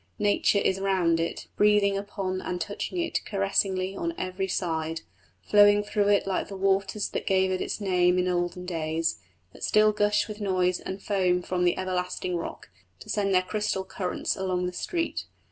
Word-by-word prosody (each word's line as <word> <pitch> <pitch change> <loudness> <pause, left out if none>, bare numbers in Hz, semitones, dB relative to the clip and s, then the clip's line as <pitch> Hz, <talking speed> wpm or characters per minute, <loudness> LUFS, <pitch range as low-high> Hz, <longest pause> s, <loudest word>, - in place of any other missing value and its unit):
Nature 205 -1 +2
is 195 -1 +1
round 185 -4 +2
it, 165 - -3
breathing 210 -1 +4
upon 195 -2 -3
and 180 - -3
touching 205 - -4
it 335 -1 -1
caressingly 195 -1 0
on 335 +9 -3
every 185 +1 -2
side; 165 -3 -2 0.4
flowing 205 0 +5
through 205 -1 0
it 205 -1 +3
like 195 -1 -1
the 195 - -7
waters 195 +1 +1
that - - -4
gave 190 -1 +3
it 185 - -1
its - - -3
name 180 -3 +2
in 180 0 +1
olden 175 0 -1
days, 160 - -1 0.3
that - - -12
still 215 0 +4
gush 210 0 +1
with 215 -1 -8
noise 185 -2 +1
and 190 +1 -7
foam 180 -3 +1
from 180 0 0
the 175 - +2
everlasting 180 -1 -2
rock, 170 -10 -6 0.3
to - - -13
send 200 -2 0
their 185 -1 +4
crystal 210 0 -1
currents 185 -2 -2
along 185 -1 -1
the 180 - -3
streets. 335 - -3
190 Hz, 180 wpm, -27 LUFS, 180-205 Hz, 0.4 s, flowing